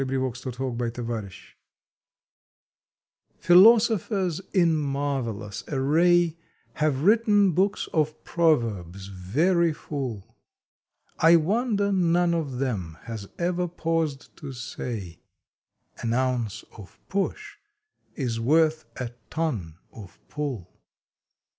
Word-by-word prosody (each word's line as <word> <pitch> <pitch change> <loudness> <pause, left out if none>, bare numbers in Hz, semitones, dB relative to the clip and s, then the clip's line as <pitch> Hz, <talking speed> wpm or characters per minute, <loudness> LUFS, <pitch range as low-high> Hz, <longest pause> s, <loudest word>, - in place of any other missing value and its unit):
September 130 -1 -1
Twentieth 125 +1 -8 0.4
OVERLOOKED 110 -5 -5 1.9
PHILOSOPHERS 195 -2 +4
in 170 -5 +3
marvelous 135 -8 -3
array 165 +4 +3 0.4
Have 150 -3 0
written 205 -1 +4
books 190 +5 0
of 155 -1 0
proverbs 110 - 0
very 160 - +1
full. 120 -8 -6 0.8
I 165 +1 +7
wonder 200 +4 +1
none 175 -2 +2
of 150 -6 -2
them 100 -12 -3
has 110 -4 -7
ever 175 +1 0
paused 165 -4 -2
to 145 -4 -7
say: 110 -7 -6 0.8
An 115 0 -1
Ounce 125 -5 -1
of 100 -3 -13
Push 405 - -3 0.6
is 120 -5 -2
worth 155 +5 +2
a 125 -2 -4 0.2
Ton 115 - -3 0.2
of 100 -5 -12
Pull 130 - -5
145 Hz, 95 wpm, -25 LUFS, 115-175 Hz, 1.9 s, I